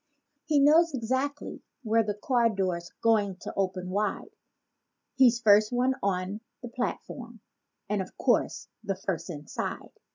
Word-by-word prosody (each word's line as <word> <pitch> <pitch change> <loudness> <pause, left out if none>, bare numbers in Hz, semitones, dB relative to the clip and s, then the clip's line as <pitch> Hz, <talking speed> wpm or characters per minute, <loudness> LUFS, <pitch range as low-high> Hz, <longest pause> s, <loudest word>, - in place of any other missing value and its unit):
He 300 -2 +3
knows 310 +2 +5
exactly 260 +4 -2 0.2
where 225 0 +3
the 210 -2 -2
car 235 +2 +2
door's 185 -4 -2
going 210 -4 +3
to - - -6
open 185 -1 -2
wide; 205 +2 -2 0.8
He's 245 -3 +5
first 210 -1 +5
one 250 +2 +2
on 195 +2 -1 0.2
the 240 - -5
platform, 240 0 -5 0.5
and 205 -1 0
of 185 - -9
course - - +1 0.2
the 195 -2 -2
first 185 -2 -4
inside. 150 -3 -5
215 Hz, 135 wpm, -28 LUFS, 195-245 Hz, 0.8 s, knows